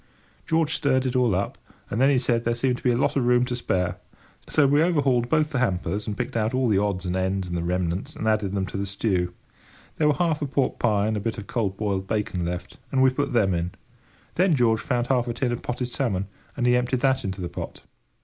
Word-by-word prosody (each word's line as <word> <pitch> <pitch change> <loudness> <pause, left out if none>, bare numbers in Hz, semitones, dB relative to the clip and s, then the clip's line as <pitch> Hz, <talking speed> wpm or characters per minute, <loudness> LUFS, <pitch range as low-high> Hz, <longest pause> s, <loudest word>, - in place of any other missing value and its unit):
George 160 -1 +2
stirred 135 -3 +1
it 130 0 -1
all 125 -6 +3
up, 95 - -2 0.3
and 115 - 0
then 135 - +6
he 140 - +4
said 125 -2 +2
that 115 - -13
there 120 0 +1
seemed 125 +1 0
to - - -13
be 125 - +2
a 120 - +2
lot 130 - +1
of 135 - +2
room 125 0 +4
to 125 -1 -3
spare, 90 -6 -1 0.5
so 150 - +3
we 145 +2 +4
overhauled 140 -8 +2
both 155 -1 +2
the 135 - 0
hampers, 100 -3 -1
and 105 -1 -3
picked - - -3
out 115 +2 0
all 130 -1 +2
the 105 -4 +3
odds 100 -3 -1
and 90 0 -1
ends 95 0 -1
and 90 - -4
the 85 - -1
remnants, 90 +1 -2
and 110 - -3
added 105 -3 +1
them 95 -1 0
to 95 - -6
the 100 0 -2
stew. 95 -3 0 0.7
There 155 - +3
were 150 - +3
half 165 -4 0
a 145 - -1
pork 135 0 0
pie 105 -4 +2
and 110 0 0
a - - -1
bit 110 +2 -3
of 105 - -6
cold 100 -5 -2
boiled 100 -3 -1
bacon 105 -4 -1
left, 90 +1 -5
and 130 -1 +3
we 130 - +5
put 140 +2 -1
them 105 -6 +3
in. 85 +1 -2 0.6
Then 180 -2 +3
George 115 -4 +3
found 120 -2 0
half 125 -1 +1
a 120 - -2
tin 125 0 0
of 120 - -3
potted 125 0 -3
salmon, 110 -8 -1 0.3
and 125 - 0
he 125 0 +5
emptied 125 0 0
that 135 -1 +2
into 95 0 -4
the 90 - -3
pot. - - -7
120 Hz, 255 wpm, -25 LUFS, 95-130 Hz, 0.7 s, then